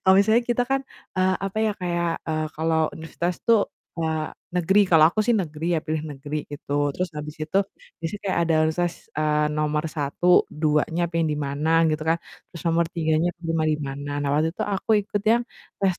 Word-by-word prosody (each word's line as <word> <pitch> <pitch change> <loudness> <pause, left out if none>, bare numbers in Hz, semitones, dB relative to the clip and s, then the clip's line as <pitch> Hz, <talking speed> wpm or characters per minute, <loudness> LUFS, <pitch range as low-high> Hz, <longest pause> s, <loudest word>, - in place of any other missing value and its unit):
Kalau 190 0 +6
misalnya 220 +4 +4
kita 240 +1 +2
kan, 270 0 +2 0.4
eee, 185 0 +3
apa 195 +2 -3
ya 220 -1 +2
kayak, 175 -1 -1 0.2
eee, 155 -1 -1
kalau 160 0 +1
universitas 170 +2 -3
tuh 230 -3 +5 0.4
wa 160 -1 -1 0.2
negeri, 190 +4 +4
kalau 160 -1 +7
aku 215 +5 -1
sih 240 - +3
negeri 170 -5 -1
ya, 160 - +1
pilih 155 0 -2
negeri 145 0 -5
gitu, 145 0 -1
terus 180 +4 -2
habis 150 0 -5
itu 160 +5 +1 0.4
di 165 - -2
situ 205 - -6
kayak 185 - +1
ada 165 -1 +2
universitas, 175 +1 -2
eee, 150 0 +2
nomor 150 0 0
1, 155 +4 +3
2-nya 155 +3 +1
pengen 165 -1 0
di - - -2
mana 145 +3 -1 0.2
gitu 155 0 -1
kan, 165 +1 +2 0.3
terus 170 - -8
nomor 170 +1 +3
3-nya 160 0 +1
keterima 165 -2 -1
di 155 -1 +2
mana. 140 +1 -5
Nah 145 - -1
waktu 160 +2 +1
itu - - -4
aku 195 - -4
ikut 205 0 -3
yang 240 +1 +3 0.4
test 190 -3 +1
165 Hz, 195 wpm, -24 LUFS, 155-180 Hz, 0.4 s, kalau